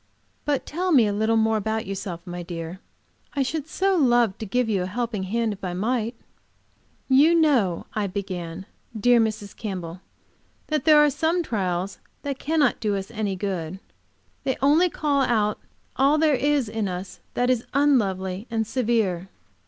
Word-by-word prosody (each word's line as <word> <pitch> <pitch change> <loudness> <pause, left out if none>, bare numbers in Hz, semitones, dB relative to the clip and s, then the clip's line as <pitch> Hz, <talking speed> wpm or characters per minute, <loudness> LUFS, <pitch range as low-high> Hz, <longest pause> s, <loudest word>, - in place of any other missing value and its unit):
But 290 -2 0
tell 360 +4 -2
me 255 -8 +6
a 205 - 0
little 220 +2 +2
more 220 0 +3
about 220 +1 -2
yourself, 190 -3 -5
my 175 0 -6
dear. 170 +1 -6 0.6
I 280 - +2
should 305 +2 -3
so 385 +3 +1
love 240 - +3
to 220 - -5
give 250 +4 +1
you 205 -4 +1
a - - -1
helping 230 0 -2
hand, 225 +2 0
if 200 - -13
I 180 -1 -3
might." 230 +4 -1 0.9
"You 290 +6 +5
know," 260 - +2
I 210 -2 -1
began, 185 -2 -5 0.3
"dear 245 +3 +5
Mrs. 215 -2 -1
Campbell, 180 -5 -6 0.7
that 305 -1 0
there 310 -2 +7
are 295 -1 +6
some 330 +5 +1
trials 190 - -2 0.2
that 280 -2 -3
cannot 300 -4 +1
do 210 -2 0
us 195 +2 -5
any 210 -4 -2
good. 185 -3 -3 0.7
They 265 - -1
only 310 +6 +4
call 290 -4 0
out 215 -5 +1 0.4
all 275 +3 +4
there 310 -1 +3
is 285 -1 +1
in 215 -1 -2
us 180 +1 -6 0.2
that 245 +1 +2
is 245 -2 -1
unlovely 200 -8 +1
and 225 -1 0
severe." 215 -6 0
220 Hz, 170 wpm, -24 LUFS, 190-275 Hz, 0.9 s, there